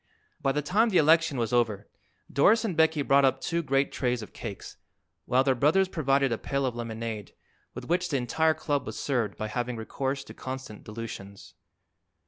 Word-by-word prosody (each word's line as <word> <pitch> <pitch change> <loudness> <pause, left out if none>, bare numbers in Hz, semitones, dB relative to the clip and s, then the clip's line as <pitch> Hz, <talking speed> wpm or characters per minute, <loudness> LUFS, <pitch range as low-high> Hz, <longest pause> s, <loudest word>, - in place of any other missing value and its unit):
By 135 - +2
the 145 +2 -1
time 215 +9 +3
the 190 - +2
election 160 -1 +4
was 115 -1 -1
over 110 -4 +1 0.5
Doris 215 +11 +4
and 190 -6 -2
Becky 160 -2 +3
brought 140 0 +4
up 135 0 +3
two 170 +3 -1
great 135 -2 +1
trays 125 -3 -1
of - - -12
cakes, 105 -4 -8 0.5
while 130 +2 +3
their 135 -1 +3
brothers 155 +10 +3
provided 140 -6 +1
a 115 - -1
pail 140 -1 -1
of 125 -2 -2
lemonade, 115 -2 -5 0.4
with - - -7
which 175 +1 0
the 140 - +1
entire 160 +6 +1
club 145 -3 -2
was - - -5
served 120 -7 -1
by 110 - -3
having 120 +3 -3
recourse 135 +4 -3
to - - -12
constant 130 -4 -7
dilutions. 105 -3 -8
135 Hz, 185 wpm, -28 LUFS, 115-155 Hz, 0.5 s, election